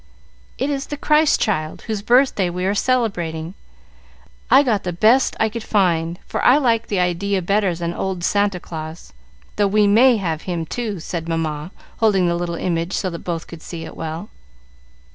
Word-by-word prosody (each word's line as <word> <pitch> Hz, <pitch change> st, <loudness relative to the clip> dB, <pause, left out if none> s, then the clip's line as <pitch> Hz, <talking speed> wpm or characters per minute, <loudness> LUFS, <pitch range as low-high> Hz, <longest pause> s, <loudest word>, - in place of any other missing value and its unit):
"It 275 Hz, +3 st, -1 dB
is 275 Hz, -1 st, -3 dB
the 295 Hz, -, -5 dB
Christ 305 Hz, +1 st, +3 dB
child, 155 Hz, -9 st, -1 dB
whose 215 Hz, -3 st, -3 dB
birthday 240 Hz, -5 st, +3 dB
we 180 Hz, +1 st, -3 dB
are 195 Hz, -, +1 dB
celebrating. 180 Hz, -9 st, -1 dB, 1.0 s
I 265 Hz, +4 st, +7 dB
got 220 Hz, -7 st, +1 dB
the 180 Hz, -, -2 dB
best 220 Hz, +9 st, +3 dB
I 220 Hz, -, +3 dB
could 230 Hz, +2 st, -5 dB
find, 170 Hz, -5 st, +1 dB
for -, -, -3 dB
I 255 Hz, -, +6 dB
like 230 Hz, -5 st, +1 dB
the 200 Hz, -, -1 dB
idea 180 Hz, +3 st, 0 dB
better 195 Hz, -1 st, +1 dB
than 170 Hz, 0 st, -3 dB
old 185 Hz, -1 st, -3 dB
Santa 200 Hz, -1 st, +1 dB
Claus; 160 Hz, -, -8 dB, 0.4 s
though 205 Hz, -1 st, +3 dB
we 210 Hz, +1 st, +3 dB
may 230 Hz, +4 st, +5 dB
have 165 Hz, -6 st, -2 dB
him, 170 Hz, -2 st, -2 dB
too," 215 Hz, +1 st, -4 dB
said 165 Hz, +1 st, -5 dB
Mamma, 160 Hz, -1 st, -2 dB, 0.3 s
holding 195 Hz, -5 st, +3 dB
the 170 Hz, -, +1 dB
little 170 Hz, 0 st, -3 dB
image 170 Hz, +1 st, -2 dB
so 185 Hz, -, -1 dB
that 170 Hz, -, -6 dB
both 170 Hz, -2 st, -4 dB
could 165 Hz, -2 st, -11 dB
see 165 Hz, -1 st, -7 dB
it -, -, -10 dB
well. 160 Hz, +5 st, -6 dB
190 Hz, 180 wpm, -20 LUFS, 170-220 Hz, 1.0 s, I